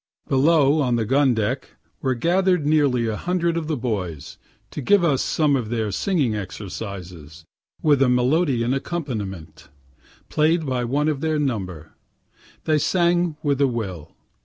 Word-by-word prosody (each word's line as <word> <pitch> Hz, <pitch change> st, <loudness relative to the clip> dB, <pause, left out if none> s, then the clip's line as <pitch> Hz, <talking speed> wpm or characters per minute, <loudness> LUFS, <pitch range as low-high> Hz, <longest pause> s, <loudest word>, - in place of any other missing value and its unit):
Below, 145 Hz, +1 st, +3 dB
on 125 Hz, -3 st, +1 dB
the 115 Hz, -2 st, 0 dB
gun 135 Hz, +1 st, +3 dB
deck, 110 Hz, +5 st, -3 dB, 0.3 s
were 130 Hz, -2 st, 0 dB
gather'd 180 Hz, +4 st, +1 dB
nearly 145 Hz, -6 st, +2 dB
a 110 Hz, -1 st, -1 dB
hundred 170 Hz, +3 st, -1 dB
of 165 Hz, -2 st, -3 dB
the 155 Hz, -2 st, -1 dB
boys, 90 Hz, -, -4 dB, 0.3 s
to -, -, -5 dB
give 200 Hz, +7 st, +3 dB
us 145 Hz, -6 st, +2 dB
some 150 Hz, -3 st, +1 dB
of 120 Hz, -5 st, -2 dB
their 110 Hz, -3 st, -1 dB
singing 145 Hz, -, 0 dB
exercises, 90 Hz, -6 st, -7 dB, 0.4 s
with 145 Hz, -3 st, +4 dB
a 135 Hz, -, +4 dB
melodeon 125 Hz, -1 st, +2 dB
accompaniment, 105 Hz, -, -5 dB, 0.6 s
play'd 160 Hz, +1 st, +1 dB
by 125 Hz, -3 st, -1 dB
one 145 Hz, +5 st, 0 dB
of 150 Hz, -3 st, -1 dB
their 155 Hz, -1 st, 0 dB
number. 95 Hz, -, -3 dB, 0.7 s
They 155 Hz, -1 st, +2 dB
sang 175 Hz, -1 st, +1 dB
with 140 Hz, -2 st, 0 dB
a 140 Hz, -, +5 dB
will. 95 Hz, -, -5 dB
130 Hz, 150 wpm, -22 LUFS, 110-155 Hz, 0.7 s, a